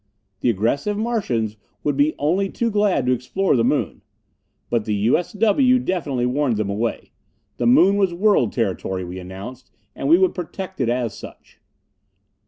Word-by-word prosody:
The 125 - +1
aggressive 120 - 0
Martians 130 - -1 0.3
would 145 -2 0
be 145 +2 +2
only 180 +7 0
too 230 +3 -1
glad 205 -10 +1
to 125 - +2
explore 130 +11 0
the 115 - +2
Moon. - - 0 0.7
But 115 -3 -1
the 105 - -1
U.S.W. 210 - +2
definitely 160 - -1
warned 125 -2 0
them 105 -2 -1
away. 115 +3 -3 0.5
The 120 - 0
Moon 185 +11 +5
was 195 -3 +2
World 175 - +2
Territory, 95 -1 -2
we 90 +1 -7
announced, 95 +8 -9 0.3
and 135 - -3
we 165 - +7
would 185 0 +2
protect 185 0 -6
it 120 - +1
as 120 -2 -1
such. - - -13
140 Hz, 160 wpm, -21 LUFS, 115-195 Hz, 0.7 s, we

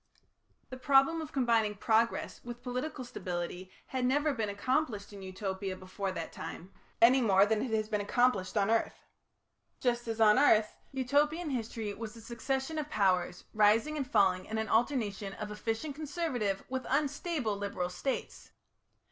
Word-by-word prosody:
The 255 - -6
problem 275 +5 +4
of 310 - -7
combining 230 -5 +2
progress 225 +3 +1
with 240 0 -8
political 255 +2 -4
stability 180 -3 -5 0.2
had 260 -1 -3
never 290 +4 +2
been 220 -5 -2
accomplished 210 -1 -1
in 200 - -9
Utopia 190 0 -4
before 185 +1 -4
that 165 -3 -5
time, 180 +4 -8 0.3
any 255 +3 +7
more 200 -4 +5
than 215 0 +1
it 260 - -2
has 215 -1 0
been 210 -1 -1
accomplished 210 -2 +1
on 205 +1 +2
earth. 230 - +1 0.8
Just 240 -1 0
as 225 0 -3
on 215 +2 +6
earth, 220 -7 +4 0.2
Utopian 290 +5 +1
history 225 -4 -3
was 220 +1 -7
a - - -11
succession 265 +6 -3
of 300 -1 -4
powers 185 -5 +1
rising 220 +8 +4
and 275 -4 -3
falling 190 -5 +3
in 220 - -4
an 220 0 -2
alternation 220 -5 0
of 210 0 -6
efficient 225 +7 -3
conservative 280 - -2
with 260 0 -4
unstable 285 - 0
liberal 200 -3 -3
States. 265 +9 -4
225 Hz, 155 wpm, -31 LUFS, 205-265 Hz, 0.8 s, any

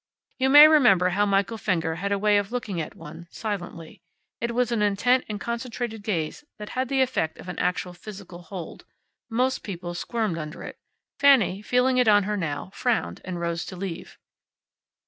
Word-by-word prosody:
You 265 +1 +2
may 295 +2 +10
remember 245 - +5
how 205 +3 +1
Michael 200 +3 0
Fenger 165 -5 -1
had 200 +3 -3
a 200 - +2
way 205 0 +3
of 200 +1 -5
looking 215 -8 -3
at 155 - -7
one, 170 +1 -11
silently. 175 -7 -6 0.4
It 235 0 -3
was 245 -1 +1
an 230 -3 0
intent 225 +5 +2
and 210 -1 -4
concentrated 235 -1 -4
gaze 180 - -3
that 210 -1 -8
had 255 0 -2
the 270 -1 +2
effect 205 -11 -2
of - - -12
an 180 - -6
actual 180 0 -1
physical 185 -2 -10
hold. 175 0 -8 0.5
Most 255 +3 0
people 175 -3 -6
squirmed 210 -1 -2
under 155 0 -7
it. - - -9 0.4
Fanny, 255 -9 +4
feeling 250 +3 +2
it 250 - +3
on 205 -1 +5
her 210 +2 -2
now, 165 -2 -4
frowned 245 -3 -1
and 180 -1 -5
rose 170 0 -2
to 185 - -8
leave. 180 -2 -7
205 Hz, 185 wpm, -25 LUFS, 180-235 Hz, 0.5 s, may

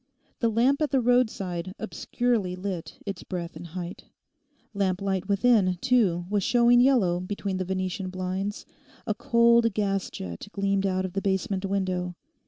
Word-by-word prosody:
The 230 - +2
lamp 250 +6 +2
at 300 - +2
the 270 - +2
roadside 200 -8 +1
obscurely 220 -3 -1
lit 185 -2 -5
its 195 -3 -5
breadth 170 -3 -5
and 170 +2 -8
height. 175 +1 -7 0.7
Lamp 190 -2 0
light 195 -1 -2
within, 200 -2 +3
too, 195 -8 +2
was 205 +1 0
showing 240 +1 +5
yellow 230 -10 +3
between 195 +1 -3
the 185 - -2
Venetian 185 +1 -2
blinds; 185 +2 -3 0.4
a 215 - 0
cold 235 0 +3
gas 195 -2 0
jet 85 - -7
gleamed 195 0 +1
out 185 0 0
of 185 - -6
the 195 - -1
basement 195 0 -1
window. 185 -2 -1
195 Hz, 155 wpm, -26 LUFS, 185-230 Hz, 0.7 s, showing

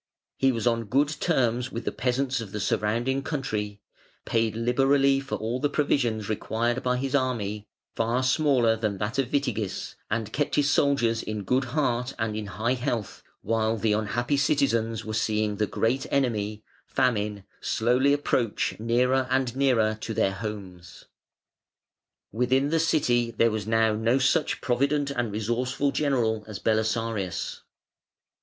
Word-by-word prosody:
He 135 0 +4
was 115 -2 -3
on 115 -1 +1
good 140 +7 +2
terms 125 -6 0
with 115 - -5
the - - 0
peasants 130 +1 -1
of 105 -4 -8
the 105 - -3
surrounding 115 +6 0
country, 105 -9 -3 0.4
paid 115 -1 0
liberally 135 +4 +3
for 135 0 -4
all 115 +3 -2
the 145 - +1
provisions 120 -8 0
required 115 +3 -1
by 125 0 0
his 135 +1 -3
army 105 -6 -1 0.3
(far 115 +3 0
smaller 130 -4 +3
than 110 -3 -2
that 110 +7 -2
of 130 -2 0
Witigis), 115 -9 -2 0.2
and 110 -1 -2
kept 145 0 0
his 145 -1 +3
soldiers 120 -6 +2
in 105 -1 -4
good 130 +5 +1
heart 125 -2 -1
and 110 -2 -2
in 105 -1 -4
high 110 +6 -1
health, 120 -5 -3 0.2
while 115 0 +1
the 110 0 +1
unhappy 120 +6 0
citizens 115 -6 +1
were 110 - -4
seeing 105 -1 0
the 105 0 +1
great 120 +7 0
enemy 110 -6 -1 0.2
Famine 105 -4 0 0.2
slowly 125 +5 +2
approach 130 -8 0
nearer 125 +3 +2
and 130 -2 0
nearer 115 -6 +2
to 110 - -4
their 95 - +2
homes. 95 -5 -8 1.3
Within 130 +5 +1
the 165 - +2
City 125 -7 +2
there 115 0 +2
was 105 -1 -3
now 110 -1 +3
no 115 +4 +2
such 135 +4 +1
provident 140 +3 +1
and 120 -5 -2
resourceful 125 +6 -1
general 120 -8 0
as 110 -2 -6
Belisarius. 110 -4 -1
120 Hz, 150 wpm, -26 LUFS, 110-135 Hz, 1.3 s, He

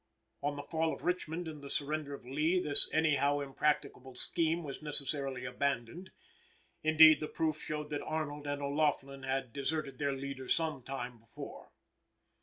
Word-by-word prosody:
On 145 0 -1
the 145 - -6
fall 160 0 0
of - - -14
Richmond, 175 -1 -2
and 155 -2 -7
the 140 - -8
surrender 145 0 -2
of 140 - -14
Lee, 155 +8 +1
this 150 -5 +7
any 155 -2 +3
how 140 +2 +2
impracticable 140 -2 -1
scheme 165 +5 +1
was 140 -1 -7
necessarily 140 -3 -1
abandoned. 140 +6 -2 0.7
Indeed, 155 0 +8
the 155 - -3
proof 155 -1 -1
showed 150 -1 -4
that 145 - -2
Arnold 150 -2 -4
and 145 0 -2
O'Laughlin 140 -1 0
had 130 -2 -2
deserted 140 -1 -2
their 140 -1 0
leader 135 -1 -6
some 160 -5 0
time 125 -2 -6
before. 115 - -10
145 Hz, 160 wpm, -33 LUFS, 135-155 Hz, 0.7 s, Indeed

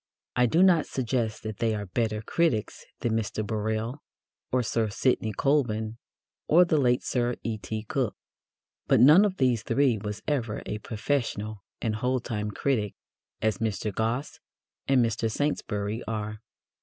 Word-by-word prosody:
I 125 0 +4
do 165 +9 +4
not 175 -5 +5
suggest 120 -3 -1
that 110 -1 -5
they 115 -2 +1
are 105 -1 -4
better 110 +2 -1
critics 125 -5 0 0.2
than 120 - 0
Mr. 110 -1 -1
Birrell 110 +5 -2 0.5
or 125 -1 +2
Sir 115 -1 0
Sidney 110 0 +1
Colvin 115 -3 0 0.5
or 175 +3 +6
the 160 -3 +2
late 125 -2 +2
Sir 120 -1 0
E.T. 110 -1 -3
Cook. 105 - -1 0.7
But - - +4
none 150 - +8
of 190 -2 -1
these 125 -4 +2
three 130 -4 +2
was 105 +1 -5
ever 120 -7 -1
a 105 - -4
professional 110 -3 -2 0.2
and 110 -2 0
whole 125 +3 +1
time 105 -3 -3
critic, 105 -2 -1 0.5
as 110 -3 +1
Mr. 105 -1 -2
Gosse 115 +7 -2 0.5
and 130 -3 +4
Mr. 115 0 -1
Saintsbury 110 -5 -1
are. 105 -1 -3
115 Hz, 150 wpm, -27 LUFS, 110-130 Hz, 0.7 s, none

